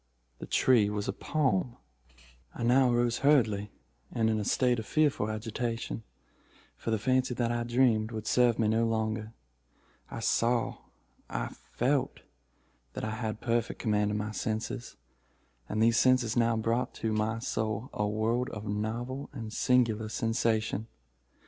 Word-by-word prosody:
The - - -7
tree 115 -6 +4
was 105 -1 -3
a - - -1
palm. 125 -6 0 0.8
"I - - -4
now 125 +1 +4
arose 120 0 +1
hurriedly, 110 -8 +3 0.4
and 110 -1 +1
in 110 - 0
a - - -1
state 125 +3 +2
of 110 - -7
fearful 145 -8 +2
agitation—for 115 +1 -6
the 110 - +2
fancy 130 +3 +1
that 120 -1 0
I 120 0 -1
dreamed 120 -3 +2
would 110 -2 -6
serve 120 -1 +3
me 110 - +2
no 115 +2 +2
longer. 110 0 -2 0.8
I - - -6
saw—I 115 - -2
felt 135 +2 -2 0.7
that - - -5
I 110 - -2
had 110 -1 -4
perfect 115 -1 0
command 105 -1 +1
of 105 - -1
my 105 +1 -3
senses—and 105 - -5
these 115 0 +4
senses 130 -3 +3
now 115 -1 +3
brought 115 +3 -1
to 110 -1 -2
my 110 +1 0
soul 110 0 -3
a 105 - 0
world 115 +5 0
of 105 0 -7
novel 115 +6 -3
and 115 -5 -6
singular 115 -4 +2
sensation. 115 -1 0
115 Hz, 140 wpm, -30 LUFS, 110-120 Hz, 0.8 s, tree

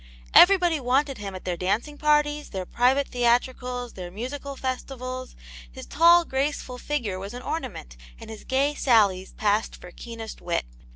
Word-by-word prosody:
Everybody 355 -3 +6
Avanted 270 0 0
him 200 -2 -6
at 185 - -9
their 180 -1 -1
dancing 205 - -1
parties, 295 0 +1
their 190 -2 -5
private 260 +7 +2
theatricals, 245 0 0
their 180 -2 -7
musical 275 +8 -6
festivals; 255 -1 -5 0.4
his - - -10
tall, 340 +3 +5
graceful 265 -2 -2
figure 235 -12 -3
was 200 +4 -7
an 250 - -8
ornament, 210 - -5 0.2
and - - -10
his 220 - -10
gay 275 +3 +1
sallies 205 -9 +2
passed 210 0 0
for 180 - -12
keenest 230 +2 -9
wit. 170 - -1
250 Hz, 155 wpm, -25 LUFS, 205-285 Hz, 0.4 s, Everybody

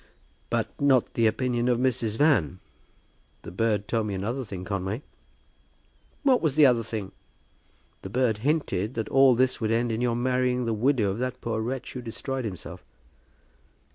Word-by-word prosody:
"But - - -2
not 135 -4 +3
the 115 -1 +3
opinion 120 +1 0
of 120 - +3
Mrs. 120 -3 0
Van. 140 - +3 0.9
The - - -8
bird 105 +1 0
told 115 -2 0
me 100 - -3
another 115 +8 -3
thing, 95 -5 -7
Conway." 100 +6 -3 1.2
"What 265 -3 +4
was 155 -5 0
the 150 -1 +7
other 125 -3 +4
thing?" 110 -4 -5 0.9
"The 95 - -7
bird 115 -1 +1
hinted 130 - -1
that 110 - -3
all 135 -2 +5
this 130 +1 +1
would 110 - 0
end 115 +1 +1
in 110 +1 -2
your 120 -1 +1
marrying 125 0 0
the 115 - 0
widow 110 -2 +2
of 100 - -5
that 125 0 -3
poor 110 -1 -2
wretch 125 +3 -4
who 125 - -5
destroyed 130 +2 -4
himself." 95 -5 -7
120 Hz, 170 wpm, -26 LUFS, 110-130 Hz, 1.2 s, the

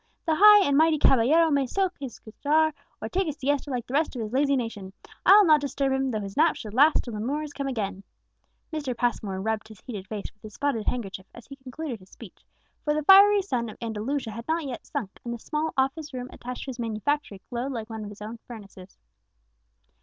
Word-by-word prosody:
The 325 - +2
high 415 +3 +8
and 285 - +2
mighty 315 +1 +4
caballero 300 +5 +4
may 280 -2 +2
smoke 380 +4 0
his 265 -5 -6
cigar, 305 +7 0 0.3
or 220 - -4
take 375 +9 -1
his 300 -1 -4
siesta, 285 0 -1
like 245 -3 -3
the 250 - -9
rest 305 0 +1
of 235 - -3
his 215 +2 -6
lazy 280 +1 +3
nation; 210 -6 -4 0.3
I'll 410 +1 +8
not 305 -3 +5
disturb 275 -1 -1
him, 265 0 0
though 215 -4 -2
his 195 -1 -7
nap 315 +2 +4
should 210 -2 -8
last 295 +6 +5
till 240 - -7
the 210 - -4
Moors 290 +6 -3
come 280 -1 -4
again!" 200 -7 -3 0.7
Mr. 280 -6 -3
Passmore 215 -6 -1
rubbed 220 +2 -2
his 215 -3 -14
heated 205 -6 -7
face 210 -1 -6
with 210 - -43
his 215 -2 -11
spotted 280 -7 -1
handkerchief 195 -6 -3
as 235 - -12
he 275 - -11
concluded 265 -1 -7
his 185 0 -19
speech, 225 -7 -14 0.4
for 295 0 +1
the 305 - -1
fiery 400 +3 +7
sun 240 - -2
of 215 - -11
Andalusia 230 +3 -3
had 230 +2 -8
not 320 0 0
yet 250 -4 -7
sunk, 235 -10 -5
and 235 0 -4
the - - -7
small 305 +6 -3
office 270 +2 -1
room 250 0 -5
attached 250 +1 -7
to 270 - -5
his 245 - -11
manufactory 230 0 -2
glowed 245 +3 -3
like 225 -4 -5
one 220 -1 -5
of 205 - -7
his 210 0 -10
own 225 +2 -7
furnaces. 200 -5 -12
255 Hz, 225 wpm, -26 LUFS, 220-295 Hz, 0.7 s, high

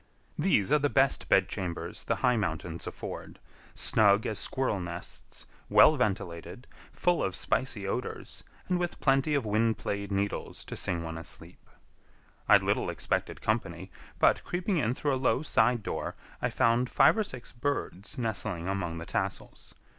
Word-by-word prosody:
These 150 - +2
are 150 - +5
the 145 0 +1
best 135 -1 +2
bedchambers 95 -2 0
the - - +1
high 125 -1 +4
mountains 85 -5 -3
afford—snug 105 -1 0
as 110 - -2
squirrel 130 -7 0
nests, 85 -1 -8 0.2
well 155 - +7
ventilated, 95 - -3 0.3
full 175 -1 +1
of 95 - -1
spicy 120 -6 0
odors, 125 +5 -5 0.2
and 180 -1 +1
with 175 -1 -3
plenty 135 +2 +2
of 140 -5 0
wind 110 +2 +1
played 100 0 -4
needles 100 +1 -2
to - - -7
sing 85 -1 0
one 80 0 -5
asleep. 80 +1 -9 0.8
I - - +9
little - - 0
expected - - -2
company, - - -2 0.3
but, - - +3
creeping 180 +2 -1
in 125 -4 +1
through 145 0 0
a 130 - -1
low 130 +2 +2
side 120 -5 +2
door, - - -4 0.3
I - - +1
found 120 +2 +2
five - - +5
or 220 - +1
six 130 - -8
birds 120 -4 -3
nestling 105 -7 -2
among 90 -4 -2
the 85 - -6
tassels. - - -4
110 Hz, 155 wpm, -29 LUFS, 95-135 Hz, 0.8 s, I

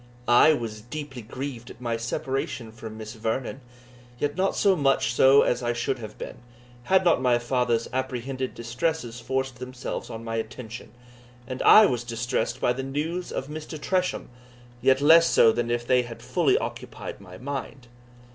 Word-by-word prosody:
I 120 +6 +7
was 115 -6 -4
deeply 135 +2 -7
grieved 120 +1 -6
at - - -12
my 120 -2 -2
separation 120 0 -3
from 110 -1 -9
Miss 110 0 -7
Vernon, 115 +4 -3 0.6
yet 145 +3 -1
not 190 +1 +1
so 195 -2 +4
much 135 -6 +2
so 135 +3 +6
as 125 - 0
I 120 0 0
should 125 +2 -2
have 110 -2 -9
been, - - -7 0.5
had 190 +3 +3
not 170 -7 +4
my 125 -2 +3
father's 120 -1 0
apprehended 130 0 -3
distresses 120 +1 -2
forced 130 +1 -2
themselves 125 0 -6
on 115 0 -7
my 115 0 -3
attention; 115 +1 -6 0.5
and 130 +1 -5
I 215 - +9
was 120 - 0
distressed 120 0 -2
by 125 - +2
the 130 - -4
news 155 +7 -3
of - - -3
Mr. 155 +1 -7
Tresham, 185 +3 -1 0.5
yet 130 +2 +4
less 165 +3 +7
so 115 - +6
than 120 +1 -2
if 120 0 -1
they 125 0 +4
had 120 -1 -9
fully - - +2
occupied - - -6
my 90 -2 -11
mind. 135 0 -6
125 Hz, 170 wpm, -26 LUFS, 115-135 Hz, 0.6 s, I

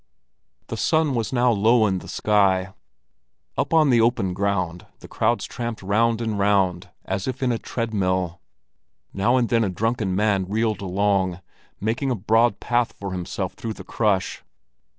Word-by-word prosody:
The - - -4
sun 155 -3 +2
was 115 -3 -2
now 125 -1 +3
low 110 +2 +4
in 95 -3 0
the - - -12
sky. 95 -3 +1 0.8
Up - - -1
on 155 -4 +4
the 120 -2 +5
open 115 -6 +1
ground 90 -3 -2
the - - -13
crowds 120 +2 0
tramped 120 -4 -5
round 115 +4 +1
and 110 -3 -2
round 95 -2 +1 0.2
as 95 0 -3
if 130 +1 -3
in 125 - +2
a 115 - -1
tread 115 -2 -4
mill. 95 -3 -1 0.7
Now 100 +6 +2
and 120 -2 +2
then 115 -1 +2
a 100 - 0
drunken 110 0 -1
man 100 -2 +1
reeled 110 0 0
along, 95 -1 0 0.4
making 115 +6 -1
a 125 - +1
broad 110 +2 +2
path 120 -1 0
for 100 -1 -6
himself 90 +1 -4
through 115 -1 -5
the - - -10
crush. 100 -5 0
105 Hz, 170 wpm, -23 LUFS, 95-115 Hz, 0.8 s, the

